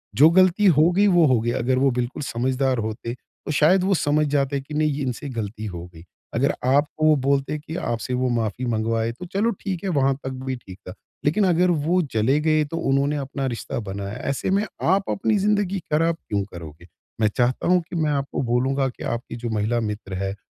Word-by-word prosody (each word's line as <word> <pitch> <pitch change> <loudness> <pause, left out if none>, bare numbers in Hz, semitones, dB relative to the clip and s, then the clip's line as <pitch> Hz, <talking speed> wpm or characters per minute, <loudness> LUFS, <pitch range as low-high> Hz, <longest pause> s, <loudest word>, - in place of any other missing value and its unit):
जो 150 +5 +7
गलती 185 +2 +4
हो 155 +3 +6
गई, 200 +3 +3
वो 175 -4 +5
हो 130 -4 +3
गई। 120 +1 0
अगर 130 +2 +1
वो 135 0 +3
बिल्कुल 125 +5 -2
समझदार 130 +1 0
होते, 110 +2 -4
तो 130 - -10
शायद 165 +5 +4
वो 195 +1 +2
समझ 150 -1 +2
जाते 140 -1 0
कि 140 +3 -11
नहीं 155 0 +2
ये 140 +1 -3
इनसे 130 +2 -4
गलती 110 -3 -5
हो 90 -4 -6
गई, 80 0 -13 0.3
अगर - - +1
आपको 145 +4 +2
वो 155 0 +6
बोलते 140 +2 +1
कि 155 +2 -8
आपसे 120 -5 -3
वो 125 0 0
माफ़ी 115 0 -1
मँगवाए, 115 0 0
तो 125 +10 -9
चलो 215 +4 +2
ठीक 185 -3 -4
है 195 - -1
वहाँ 135 -5 +2
तक 130 - -3 0.2
भी 130 -1 -2
ठीक 95 -6 -12
था। 90 - -6 0.3
लेकिन 180 +8 +3
अगर 180 +1 +3
वो 180 +3 +3
चले 115 +7 +2
गए, 155 0 +3
तो 165 +3 -5
उन्होंने 140 -1 +1
अपना 135 0 -4
रिश्ता 120 +1 -4
बनाया, 100 -1 -5
ऐसे 140 - -2
में 200 +2 +2 0.2
आप 195 +3 +2
अपनी 210 +2 +1
ज़िंदगी 200 -1 +1
खराब 165 +2 +2
क्यों 100 -1 0
करोगे? 85 0 -10 0.3
मैं 110 - +5
चाहता 125 0 +1
हूँ 180 0 +4
कि - - -6
मैं 155 -2 +1
आपको 140 -1 -2
बोलूँगा 130 +3 +1
कि 125 - -10
आपकी 120 0 -4
जो 120 0 -5
महिला 110 +2 0
मित्र 105 -3 -4
है, 95 0 -3
135 Hz, 215 wpm, -23 LUFS, 115-160 Hz, 0.3 s, जो